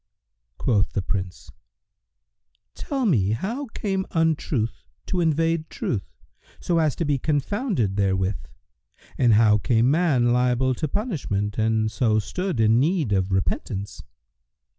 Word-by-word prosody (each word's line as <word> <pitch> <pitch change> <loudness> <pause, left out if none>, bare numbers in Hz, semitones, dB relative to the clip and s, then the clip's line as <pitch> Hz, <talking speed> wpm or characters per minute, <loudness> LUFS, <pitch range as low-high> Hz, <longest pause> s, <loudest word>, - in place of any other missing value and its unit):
Quoth 105 -4 +1
the 100 - -1
Prince, 95 -1 -5 1.2
"Tell 270 - -3
me 110 - +2
how 235 - -3
came 195 -4 -3
Untruth 155 -8 -1 0.2
to 180 - -1
invade 165 0 +1
Truth, 100 -8 -4 0.5
so 170 -2 0
as 155 -3 +1
to 170 - -2
be 145 -2 0
confounded 150 - -1
therewith 95 -4 0 0.8
and 120 -4 +5
how 105 -1 +5
became 120 +2 +2
man 140 -8 +2
liable 125 +1 +2
to 155 +5 -2
punishment 135 - -2
and 110 0 +1
so 110 -1 +1
stood 180 - -2
in 110 +1 +4
need 155 - +1
of 95 0 0
repentance." 95 +1 -2
125 Hz, 125 wpm, -24 LUFS, 105-165 Hz, 1.2 s, and